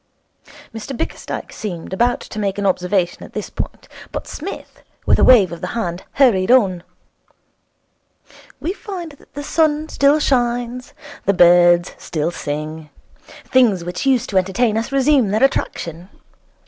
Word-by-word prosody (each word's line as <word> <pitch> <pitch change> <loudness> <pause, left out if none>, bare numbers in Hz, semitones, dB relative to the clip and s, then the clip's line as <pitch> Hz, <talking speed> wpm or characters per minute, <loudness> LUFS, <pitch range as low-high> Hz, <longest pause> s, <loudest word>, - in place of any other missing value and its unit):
Mr 225 +3 -6
Bickersdyke - - -5
seemed 180 -4 -6
about 240 +5 +1
to 215 - -8
make 200 -2 -1
an 200 - -2
observation 180 -1 0
at - - -11
this - - -5
point, - - -6 0.2
but - - -5
Psmith, 365 +6 -8 0.2
with - - +3
a - - +4
wave 210 -9 +6
of 170 - -8
the 180 - -3
hand, 175 -5 -3
hurried 220 -9 +3
on. 200 -9 +4 1.8
'We 350 - -2
find 370 -6 -7
that 285 - -21
the 290 - -5
sun 310 0 +1
still 280 +2 +3
shines, 245 -2 -1 0.3
the 200 - +2
birds 175 0 +5
still 160 +1 -2
sing. 155 0 -5 0.6
Things 225 -9 +3
which 180 +9 -4
used 255 -5 +2
to 190 - +4
entertain 205 +5 0
us 225 +4 -2
resume 275 -4 +3
their 215 +5 +1
attraction. 175 -9 -1
215 Hz, 150 wpm, -19 LUFS, 180-265 Hz, 1.8 s, wave